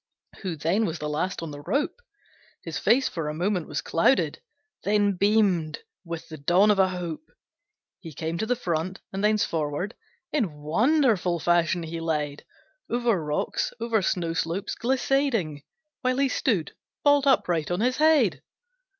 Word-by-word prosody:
Who 185 Hz, -4 st, -3 dB
then 170 Hz, +9 st, +1 dB
was 165 Hz, 0 st, -3 dB
the 150 Hz, -, -4 dB
last 165 Hz, +4 st, -2 dB
on 160 Hz, -, -5 dB
the 145 Hz, 0 st, -8 dB
rope; 295 Hz, -, -1 dB, 0.6 s
His -, -, -4 dB
face 260 Hz, +2 st, +3 dB
for 160 Hz, -3 st, -3 dB
a 150 Hz, -, -4 dB
moment 180 Hz, 0 st, -1 dB
was 150 Hz, -, -3 dB
clouded, 165 Hz, +11 st, +2 dB, 0.4 s
Then 205 Hz, -1 st, +2 dB
beamed 190 Hz, -6 st, +2 dB, 0.2 s
with 170 Hz, -1 st, -6 dB
the 160 Hz, -, -8 dB
dawn 180 Hz, +8 st, +4 dB
of 200 Hz, -, +1 dB
a 190 Hz, -, +5 dB
hope; 180 Hz, -, -5 dB, 0.7 s
He 165 Hz, -, -9 dB
came 160 Hz, +3 st, -4 dB
to 220 Hz, -, -1 dB
the 250 Hz, -, +2 dB
front, 180 Hz, -4 st, -2 dB
and 195 Hz, +1 st, -3 dB
thence 215 Hz, 0 st, +3 dB
forward 160 Hz, +5 st, -2 dB, 0.4 s
In 225 Hz, -, 0 dB
wonderful 195 Hz, -, +2 dB
fashion 175 Hz, +1 st, +2 dB
he 165 Hz, +1 st, -5 dB
led, 150 Hz, -3 st, -2 dB, 0.4 s
Over 235 Hz, -7 st, +1 dB
rocks, 150 Hz, 0 st, -1 dB
over 230 Hz, -2 st, +1 dB
snow 170 Hz, -3 st, -1 dB
slopes 165 Hz, +6 st, -2 dB
glissading, 250 Hz, -, 0 dB, 0.4 s
While 255 Hz, -1 st, +1 dB
he 275 Hz, -1 st, +2 dB
stood, 210 Hz, -, 0 dB, 0.3 s
bolt 285 Hz, -1 st, +4 dB
upright 175 Hz, -, +2 dB
on 175 Hz, +3 st, -1 dB
his 250 Hz, +2 st, +1 dB
head! 290 Hz, -, +4 dB
180 Hz, 160 wpm, -26 LUFS, 160-230 Hz, 0.7 s, a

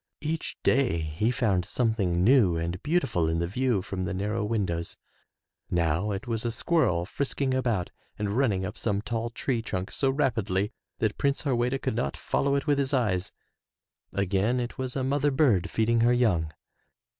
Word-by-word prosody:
Each 160 Hz, +2 st, -3 dB
day 130 Hz, -10 st, +3 dB
he 80 Hz, +7 st, -1 dB
found 105 Hz, -6 st, +1 dB
something 100 Hz, -5 st, 0 dB
new 105 Hz, -7 st, +5 dB
and 85 Hz, +2 st, -3 dB
beautiful 115 Hz, -, +1 dB
in 80 Hz, -, 0 dB
the 85 Hz, -, 0 dB
view 110 Hz, +1 st, 0 dB
from 95 Hz, -1 st, -3 dB
the 95 Hz, 0 st, -3 dB
narrow 105 Hz, +3 st, -1 dB
windows. 95 Hz, -6 st, -2 dB, 0.7 s
Now 85 Hz, +4 st, +1 dB
it 100 Hz, +3 st, -3 dB
was 115 Hz, -2 st, -2 dB
a 120 Hz, -, 0 dB
squirrel 115 Hz, -, +1 dB
frisking 135 Hz, +4 st, -1 dB
about 115 Hz, -9 st, 0 dB, 0.3 s
and 105 Hz, 0 st, -2 dB
running 105 Hz, -8 st, +1 dB
up 95 Hz, -, -6 dB
some 100 Hz, -2 st, -1 dB
tall 115 Hz, +2 st, -2 dB
tree 120 Hz, 0 st, -2 dB
trunk 95 Hz, -4 st, -4 dB
so 135 Hz, -, +1 dB
rapidly 110 Hz, -7 st, 0 dB, 0.2 s
that 110 Hz, -2 st, -1 dB
Prince 140 Hz, 0 st, +1 dB
Harweda 125 Hz, -2 st, +1 dB
could 130 Hz, -3 st, -2 dB
not 70 Hz, -, -2 dB
follow 140 Hz, 0 st, 0 dB
it 140 Hz, -, -1 dB
with 145 Hz, -2 st, +2 dB
his 140 Hz, 0 st, +1 dB
eyes; 100 Hz, -8 st, 0 dB, 0.8 s
again 100 Hz, +5 st, +1 dB
it 120 Hz, 0 st, -4 dB
was 130 Hz, -1 st, -3 dB
a 135 Hz, -, -1 dB
mother 140 Hz, +2 st, +2 dB
bird 130 Hz, -, +2 dB
feeding 115 Hz, +1 st, +2 dB
her 120 Hz, +1 st, +4 dB
young. 90 Hz, -11 st, +2 dB
110 Hz, 175 wpm, -27 LUFS, 95-130 Hz, 0.8 s, new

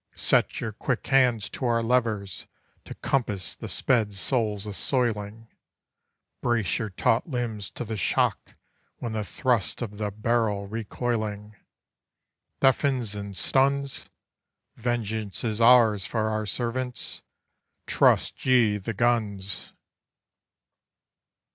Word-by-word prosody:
Set -, -, +1 dB
your 110 Hz, -, -3 dB
quick 115 Hz, +3 st, -2 dB
hands 125 Hz, -6 st, +3 dB
to -, -, -8 dB
our 115 Hz, -2 st, +2 dB
levers 110 Hz, -6 st, 0 dB, 0.4 s
to -, -, -8 dB
compass 105 Hz, -9 st, -1 dB
the -, -, -7 dB
sped 110 Hz, -6 st, +1 dB
soul's 105 Hz, -1 st, 0 dB
assoiling; 110 Hz, 0 st, -1 dB, 0.9 s
Brace 115 Hz, -10 st, +1 dB
your 110 Hz, -, -3 dB
taut 115 Hz, -, +1 dB
limbs 115 Hz, -6 st, -3 dB
to 120 Hz, -, -6 dB
the 110 Hz, 0 st, -4 dB
shock 100 Hz, -, 0 dB, 0.4 s
when 115 Hz, -2 st, -5 dB
the 110 Hz, -1 st, -1 dB
thrust 120 Hz, 0 st, 0 dB
of 105 Hz, -4 st, -6 dB
the 105 Hz, -1 st, -1 dB
barrel 105 Hz, -1 st, 0 dB
recoiling 110 Hz, -1 st, -3 dB, 1.1 s
Deafens 135 Hz, -4 st, +2 dB
and 100 Hz, -2 st, -5 dB
stuns! 140 Hz, +4 st, +1 dB, 0.7 s
Vengeance 110 Hz, -4 st, -2 dB
is 110 Hz, -1 st, -1 dB
ours 115 Hz, -4 st, +6 dB
for 110 Hz, 0 st, -1 dB
our 110 Hz, -1 st, -2 dB
servants. 125 Hz, +3 st, -3 dB, 0.6 s
Trust -, -, +2 dB
ye 120 Hz, -5 st, +4 dB
the 105 Hz, +2 st, -5 dB
guns! 100 Hz, -5 st, 0 dB
110 Hz, 110 wpm, -26 LUFS, 105-120 Hz, 1.1 s, ours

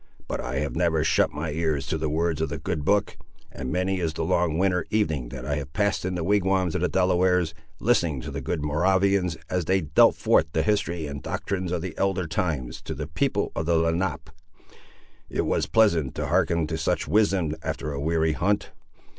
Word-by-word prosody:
But -, -, -3 dB
I -, -, -4 dB
have 70 Hz, +2 st, -2 dB
never 80 Hz, -2 st, +2 dB
shut 80 Hz, -, +3 dB
my 75 Hz, +1 st, -4 dB
ears 75 Hz, -3 st, -1 dB
to 80 Hz, +3 st, -2 dB
the 75 Hz, 0 st, -1 dB
words 80 Hz, +1 st, 0 dB
of 80 Hz, -, 0 dB
the 70 Hz, -, -4 dB
good 75 Hz, -, -3 dB
book, 100 Hz, +5 st, +1 dB, 0.3 s
and 65 Hz, -1 st, -5 dB
many 95 Hz, +1 st, 0 dB
is 80 Hz, -3 st, -1 dB
the -, -, -3 dB
long 85 Hz, -2 st, +1 dB
winter 90 Hz, -2 st, +1 dB
evening 80 Hz, -, 0 dB
that 65 Hz, 0 st, -7 dB
I 70 Hz, +1 st, -1 dB
have 70 Hz, -1 st, -6 dB
passed 100 Hz, -2 st, 0 dB
in 95 Hz, 0 st, -2 dB
the 85 Hz, -, -2 dB
wigwams 95 Hz, -2 st, +2 dB
of -, -, -1 dB
the 90 Hz, -, +2 dB
Delawares, 90 Hz, -2 st, +2 dB, 0.3 s
listening 85 Hz, -, +2 dB
to -, -, -6 dB
the -, -, -4 dB
good 80 Hz, -4 st, -2 dB
Moravians, 90 Hz, +3 st, +2 dB
as 90 Hz, -1 st, -1 dB
they 95 Hz, +3 st, +2 dB
dealt 75 Hz, -3 st, +4 dB
forth 80 Hz, -, +3 dB
the 80 Hz, -, +1 dB
history 85 Hz, -4 st, 0 dB
and 70 Hz, -1 st, -6 dB
doctrines 95 Hz, -3 st, -3 dB
of 85 Hz, -2 st, -2 dB
the 95 Hz, -, -5 dB
elder 95 Hz, -2 st, +1 dB
times, 75 Hz, -6 st, -2 dB
to -, -, -6 dB
the -, -, -4 dB
people -, -, -1 dB
of 80 Hz, -, -2 dB
the 85 Hz, -, +3 dB
Lenape! 80 Hz, -2 st, -1 dB, 1.0 s
It -, -, -1 dB
was -, -, 0 dB
pleasant 85 Hz, -, +3 dB
to -, -, -2 dB
hearken 85 Hz, -1 st, +2 dB
to 80 Hz, +1 st, -3 dB
such 80 Hz, -, 0 dB
wisdom 100 Hz, -7 st, +2 dB
after 75 Hz, +1 st, -4 dB
a 70 Hz, -, -4 dB
weary 80 Hz, +1 st, +1 dB
hunt! 100 Hz, +6 st, 0 dB
85 Hz, 205 wpm, -25 LUFS, 75-95 Hz, 1.0 s, dealt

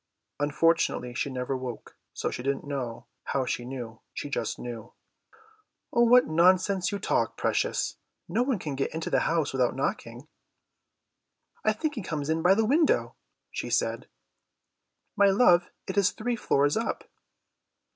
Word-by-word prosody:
Unfortunately 145 Hz, -3 st, +1 dB
she 140 Hz, -, -2 dB
never 130 Hz, 0 st, -3 dB
woke, 130 Hz, -2 st, -7 dB, 0.2 s
so -, -, -3 dB
she -, -, -5 dB
didn't 135 Hz, +2 st, -2 dB
know 130 Hz, -4 st, -4 dB, 0.2 s
how 135 Hz, -2 st, -1 dB
she 120 Hz, -1 st, -3 dB
knew, 120 Hz, -3 st, -7 dB, 0.2 s
she 145 Hz, -, -5 dB
just -, -, -2 dB
knew. 115 Hz, -2 st, -8 dB, 1.0 s
"What 240 Hz, +1 st, +6 dB
nonsense 185 Hz, +3 st, +3 dB
you 200 Hz, -, -2 dB
talk, -, -, 0 dB
precious. -, -, 0 dB, 0.3 s
No 235 Hz, -, 0 dB
one 250 Hz, -2 st, +1 dB
can 155 Hz, -5 st, -5 dB
get 135 Hz, +3 st, -2 dB
into 160 Hz, -, -3 dB
the -, -, +4 dB
house 165 Hz, -4 st, 0 dB
without 125 Hz, -2 st, +1 dB
knocking." -, -, -3 dB, 1.4 s
"I 215 Hz, -, +4 dB
think 300 Hz, +8 st, -2 dB
he 235 Hz, -, -4 dB
comes 155 Hz, -4 st, -3 dB
in 160 Hz, 0 st, 0 dB
by 180 Hz, +3 st, +5 dB
the 225 Hz, +1 st, +2 dB
window," 300 Hz, +7 st, +2 dB, 0.4 s
she -, -, -4 dB
said. -, -, 0 dB, 1.1 s
"My 200 Hz, -1 st, +5 dB
love, 185 Hz, -4 st, +5 dB, 0.2 s
it 190 Hz, -, -5 dB
is 195 Hz, -, +4 dB
three 240 Hz, +2 st, -2 dB
floors 145 Hz, -9 st, +2 dB
up." 225 Hz, -, -2 dB
160 Hz, 150 wpm, -27 LUFS, 135-200 Hz, 1.4 s, What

